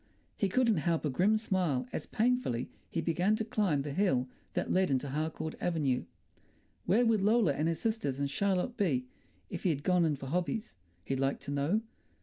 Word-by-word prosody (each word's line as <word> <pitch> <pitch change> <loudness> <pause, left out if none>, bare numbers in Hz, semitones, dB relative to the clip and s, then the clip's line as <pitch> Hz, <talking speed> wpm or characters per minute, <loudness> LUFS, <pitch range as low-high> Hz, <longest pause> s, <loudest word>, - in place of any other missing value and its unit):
He 200 - 0
couldn't 230 -1 +3
help 165 0 0
a 150 - 0
grim 200 +11 +3
smile 180 - 0
as 150 - -3
painfully 230 - 0 0.2
he 165 - -1
began 175 +6 +2
to 220 - -2
climb 185 -11 +1
the 145 -1 -4
hill 140 -9 +2 0.3
that - - -1
led 185 -1 +3
into 135 +1 0
Harcourt 155 +2 -3
Avenue. 145 -7 0 0.8
Where 225 +7 +4
would 225 -3 +3
Lola 210 -6 +4
and 150 +3 0
her 165 - +1
sisters 160 - -2
and 140 - +1
Charlotte 195 - 0
be 145 - +1 0.5
if 180 - -4
he'd 155 -6 0
gone 180 0 +3
in 155 -3 +2
for 135 - -8
hobbies, 180 - -2 0.3
he'd 135 +5 -2
like 135 0 0
to 140 - -5
know? 145 +10 +1
170 Hz, 185 wpm, -31 LUFS, 140-205 Hz, 0.8 s, Where